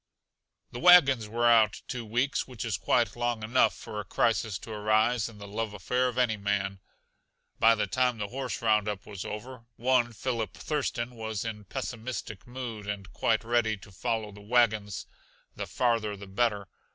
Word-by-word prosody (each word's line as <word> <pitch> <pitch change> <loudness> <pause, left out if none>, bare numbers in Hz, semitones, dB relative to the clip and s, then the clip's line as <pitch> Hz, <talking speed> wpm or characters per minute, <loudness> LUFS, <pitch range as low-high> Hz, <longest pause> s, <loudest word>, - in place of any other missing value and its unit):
The 120 - -6
wagons 135 -10 +7
were 120 +2 0
out 110 -3 +4
two 125 -2 -4
weeks 120 +6 0
which 125 -4 -6
is 110 -4 -1
quite 105 +6 +1
long 120 -2 -1
enough 120 +4 +3
for 105 - -7
a - - -3
crisis 110 -3 +1
to 110 - -10
arise 110 +2 +2
in 110 - -14
the 100 0 -9
love 105 +1 -3
affair 125 +7 0
of 125 -1 -4
any 120 -4 +2
man. 100 -1 -1 0.8
By 115 0 +6
the 105 - 0
time 125 -2 +1
the 105 -1 -4
horse 130 -1 -4
roundup 105 -3 +1
was 100 -3 -7
over, 115 +3 -7
one 120 0 +2
Philip 115 -3 -3
Thurston 130 -5 -2
was 110 -2 -4
in 105 -2 -5
pessimistic 120 -3 -5
mood 120 -5 -6
and 100 -3 -5
quite 110 +3 +1
ready 115 -2 +1
to 100 - -15
follow 110 +2 -2
the 105 0 -13
wagons, 110 -3 +1 0.5
the - - -5
farther 115 -4 0
the 100 - -9
better. 100 0 0
115 Hz, 175 wpm, -29 LUFS, 105-120 Hz, 0.8 s, wagons